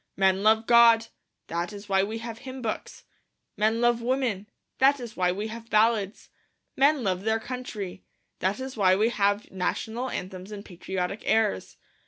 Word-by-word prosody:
Men 190 0 +3
love 220 +2 +4
God; 230 -1 +6 0.4
that 170 +3 -3
is 205 0 -10
why 195 -1 +3
we 215 +3 -2
have 230 0 -7
hymn 260 -1 -8
books. 220 - -5 0.5
Men 220 +2 +1
love 240 -1 +3
women; 235 -5 -1 0.3
that 275 +1 +5
is 235 -3 -8
why 180 -1 +2
we 200 +4 -3
have 230 +1 -9
ballads. 215 -2 +1 0.5
Men 280 0 +3
love 185 -3 0
their 220 +2 +1
country; 215 -6 -6 0.4
that 195 +4 0
is 265 0 -6
why 190 -4 +4
we 215 +4 +2
have 205 -2 0
national 225 +6 -2
anthems 185 0 -6
and 205 -1 -8
patriotic 185 +2 -4
airs. 220 - +1
215 Hz, 165 wpm, -26 LUFS, 195-235 Hz, 0.5 s, God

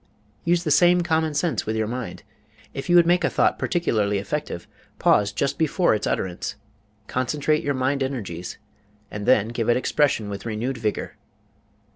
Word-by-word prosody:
Use 175 0 +2
the 155 - -1
same 175 +4 +5
common 160 -2 0
sense 155 -4 0
with 110 - -1
your 110 0 0
mind. 125 +2 -5 0.5
If 135 +3 -6
you 175 - +5
would 175 -1 +7
make 175 +1 +3
a - - +3
thought - - +1
particularly 110 - 0
effective, 100 - -4 0.3
pause 105 0 +3
just 140 +6 -2
before 165 - +2
its 105 - -1
utterance, 90 -2 -2 0.5
concentrate 145 +6 0
your 145 -1 0
mind 130 +2 0
energies, 100 -11 -4 0.5
and 105 0 -5
then 110 +1 +4
give 115 -1 -2
it 120 - +4
expression 130 -4 +1
with 100 -1 -6
renewed 120 +3 -3
vigor. 110 -2 -3
130 Hz, 165 wpm, -23 LUFS, 110-155 Hz, 0.5 s, would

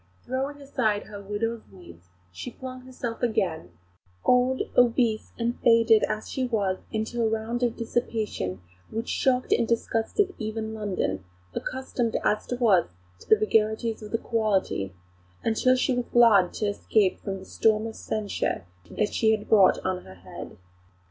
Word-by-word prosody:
Throwing 270 +3 -3
aside 240 -7 0
her 205 -1 -9
widow's 220 +3 -2
weeds, 90 - -15 0.2
she 90 - -7
flung 255 0 -9
herself 240 -3 -5
again 185 - 0 0.6
old, 250 +1 +3
obese, 235 -2 +3
and 235 +1 -1
faded 230 -2 +5
as 215 - -3
she 260 -1 -2
was 200 -5 0
into 220 +2 -2
a 225 - +2
round 225 +2 -2
of 240 -2 +1
dissipation 220 - -2 0.3
which 225 +2 -4
shocked 255 -1 +1
and 230 - +2
disgusted 235 - 0
even 220 0 -3
London, 185 - -2 0.3
accustomed 255 - -2
as 210 - 0
it 245 - -2
was 205 -8 +4 0.3
to - - -17
the - - +8
vagaries 220 +1 +1
of 210 -1 -9
the 230 - +1
"quality," 205 - 0 0.5
until 240 +3 +3
she 255 +1 +1
was 245 -1 -1
glad 220 -7 +6
to 215 - -2
escape 205 -1 +1
from 195 -1 -4
the 190 - -11
storm 215 +1 +2
of 225 - -6
censure 215 - -2 0.4
she 220 +1 +1
had 210 - -12
brought 200 -4 +6
on 185 -1 -1
her 95 - -12
head. 90 0 -10
220 Hz, 155 wpm, -26 LUFS, 205-240 Hz, 0.6 s, the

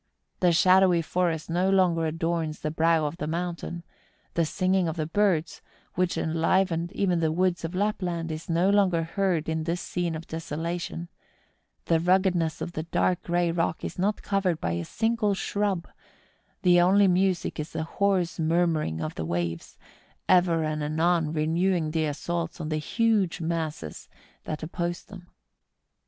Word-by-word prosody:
The 180 -1 +4
shadowy 185 0 +5
forest 165 -2 -1
no 180 +3 +1
longer 175 -4 +3
adorns 165 -1 -2
the 155 - -2
brow 160 0 +2
of 150 +3 -4
the 150 - -4
mountain; 170 +1 -4 0.5
the 170 - +2
singing 185 +2 +1
of 160 - -2
the 155 -2 -2
birds, 175 -1 0 0.3
which 180 0 0
enlivened 165 +1 +1
even 180 -4 +1
the 160 -1 +1
woods 180 +1 0
of 165 +2 -4
Lapland, 180 -5 -1
is 155 +2 -7
no 175 +4 +3
longer 190 -5 +3
heard 170 -1 -1
in 160 0 -1
this 170 +1 -1
scene 175 -2 -2
of 160 +1 -7
desola¬ 165 +2 -4
tion; 170 0 -6 0.8
the 165 -1 +3
ruggedness 180 -2 +1
of 175 - -3
the 155 - -4
dark 175 +2 0
grey 175 0 0
rock 165 -1 -1
is - - -6
not 205 +3 0
covered 190 -5 0
by 85 - -2
a 85 0 -2
single 225 - 0
shrub; 200 -3 -1 0.8
the 175 -1 +6
only 195 +3 +5
music 185 -2 +1
is 150 - -4
the 160 - -3
hoarse 185 0 0
murmuring 160 - +1
of 80 -1 -3
the 80 - -4
waves, 85 0 -3 0.5
ever 175 -3 +4
and 155 0 -2
anon 160 +1 +1
re¬ 155 -1 -1
newing 170 -1 +1
the 160 0 0
assaults 165 +3 -3
on 155 -2 -4
the 155 - 0
huge 205 +1 +1
masses 160 - -4 0.4
that 155 0 -5
oppose 170 +1 -3
them. 190 -3 -12
170 Hz, 165 wpm, -26 LUFS, 160-185 Hz, 0.8 s, the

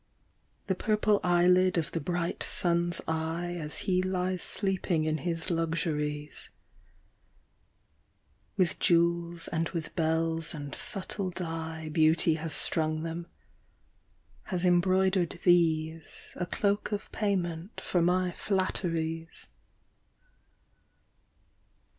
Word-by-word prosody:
The 190 - 0
purple 210 +1 +1
eyelid 180 +1 +4
of 165 -1 -1
the 165 - -2
bright 175 +2 -2
sun's 170 0 +2
eye 165 +2 -2
As 150 0 -5
he 185 -1 +2
lies 185 -1 -1
sleeping 190 -5 +1
in 155 0 0
his 165 +3 -1
luxuries... 155 -3 -2 2.1
With 180 -4 +1
jewels 170 0 +2
and 165 0 -1
with 165 -4 -5
bells 165 0 0
and 145 -2 -7
subtle 195 -1 -1
dye 160 -3 -5
Beauty 155 +1 +3
bas 160 0 -4
strung 155 -1 +1
them, 165 +1 -5 1.2
bas 185 -2 0
embroidered 185 0 +2
these 160 -3 +1
A 180 - -2
cloak 205 +3 0
of 205 0 -4
payment 185 -3 -2
for 175 - 0
mv 180 +1 +2
flatteries. 165 -5 -2
170 Hz, 100 wpm, -29 LUFS, 160-185 Hz, 2.1 s, eyelid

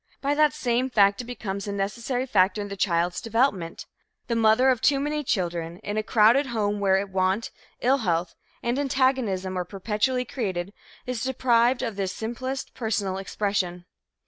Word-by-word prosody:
By 280 +1 0
that 300 0 +3
same 255 -3 0
fact, 200 -2 +4
it - - -9
becomes 200 -5 -5
a - - -2
necessary 230 +6 -2
factor 205 -4 +2
in 205 0 -4
the 200 - -5
child's 175 -2 0
development. 225 -7 0 0.4
The 235 - -1
mother 225 +3 +4
of 245 -3 -1
too 280 -1 +3
many 300 +1 -1
children, 170 - -2
in 205 - -3
a 215 - +1
crowded 230 +6 +4
home 210 -4 -1
where 195 0 +2
want, 190 +2 0 0.3
ill 270 +3 +3
health 170 -5 -1 0.3
and 240 +3 0
antagonism 255 -9 0
are 180 - -1
perpetually 210 +7 -1
created, 195 -7 -3 0.3
is 250 -3 -3
deprived 250 -1 +2
of 225 -5 -3
this 190 -2 -1
simplest 255 +4 -4
personal 200 -5 -2
expression. 190 -3 -2
215 Hz, 165 wpm, -25 LUFS, 190-250 Hz, 0.4 s, fact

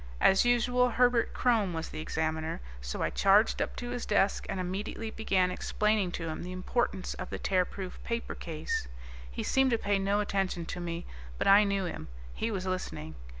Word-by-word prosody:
As 190 +5 +5
usual, 245 +1 +3
Herbert 245 -1 +3
Krome 220 -7 +2
was 165 0 -4
the - - -6
Examiner, 160 0 -2 0.2
so - - -3
I - - 0
charged 200 +3 +4
up - - -2
to 245 -1 -5
his 245 -1 -3
desk 200 -1 +1
and 195 - -2
immediately 200 +4 -3
began 190 -5 +1
explaining 210 0 +1
to 165 - -3
him 155 - -4
the 180 - -6
importance 185 +1 -1
of - - -6
the - - -4
Tearproof 185 0 -1
Paper 230 0 -3
Case. 155 - -3 0.4
He - - -4
seemed 265 0 +3
to 235 - +2
pay 205 -2 +1
no 200 +1 +1
attention 195 -4 -1
to 180 - -5
me, 170 0 -4 0.3
but - - -1
I 200 +2 +8
knew 200 -1 0
him; 160 - -5 0.3
he 225 - -2
was 190 -4 -3
listening. 180 - -4
195 Hz, 190 wpm, -30 LUFS, 175-220 Hz, 0.4 s, I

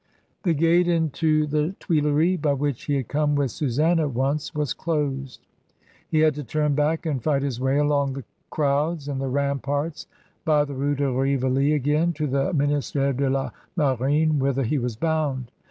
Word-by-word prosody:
The 170 -5 +1
gate 165 +3 +3
into 160 -2 +1
the 150 +5 -1
Tuileries, 155 +3 +1
by 145 -3 +1
which 140 -2 -2
he 145 - 0
had 135 -4 -2
come 150 0 +1
with 140 -4 0
Susam: 155 +7 +1
once, 140 +6 -1
was 150 -4 -1
closed; 140 -5 -3 0.6
he 155 - +2
had 155 -1 +4
to 145 +1 -6
turn 150 +4 0
back 150 +3 0
and 145 -6 -1
fighihi^ 140 -3 0
way 130 +2 +1
along 145 -2 +1
the 135 0 -6 0.3
crowds 145 +1 0
and 135 -2 -3
the 135 - -2
ramparts 140 +3 -2 0.4
of 150 -2 +3
the - - -4
R:e 140 +2 -1
de 140 0 0
Rivoli 135 +2 +1
again, 150 +4 +1
to 155 -1 -2
the 135 0 0
Minist^re 145 -2 0
de 135 +1 0
la 135 0 -1 0.3
Maiint 145 +2 +2
whither 135 0 +1
he 140 +5 0
was 120 -2 -3
bound. 140 -3 -1
145 Hz, 170 wpm, -24 LUFS, 135-155 Hz, 0.6 s, had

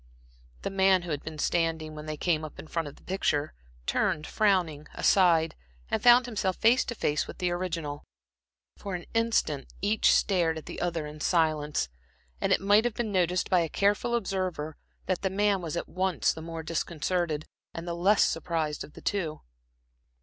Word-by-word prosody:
The - - -2
man 190 -1 +4
who 175 - -5
had 145 -1 -2
been 160 -1 -7
standing 160 -1 0
when 150 0 -8
they 155 0 -4
came 160 -2 +1
up 155 - -8
in - - -8
front 165 0 -3
of 145 - -9
the - - -21
picture, 155 -6 0 0.3
turned 150 - 0
frowning 175 -8 +1
aside, 165 -4 +4 0.4
and - - 0
found 245 0 +7
himself 205 -6 -1
face 235 +4 +4
to 240 - -4
face 150 -7 0
with - - -9
the 180 -1 0
original. 165 -5 -3 0.7
For 200 -3 -5
an 175 - -6
instant 225 -11 0
each 210 +2 +3
stared 170 -5 +2
at 160 - -8
the - - -7
other 170 -3 -1
in 150 0 -9
silence, 155 -4 +1 0.5
and - - +1
it - - +4
might 205 +2 +5
have 240 -3 -1
been 230 -3 -2
noticed 180 -1 +1
by 180 - +5
a 165 -2 0
careful 205 +6 +1
observer 185 -8 -2 0.3
that 185 -2 -1
the 190 - 0
man 200 0 +1
was 170 -1 -4
at - - -3
once 185 -3 0
the 160 - -8
more 165 0 -6
disconcerted 165 0 -1 0.3
and 165 +1 -7
the 170 - -2
less 195 +5 +4
surprised 160 -3 -2
of 150 - -12
the - - -12
two. 165 -7 -2
175 Hz, 185 wpm, -28 LUFS, 155-195 Hz, 0.7 s, found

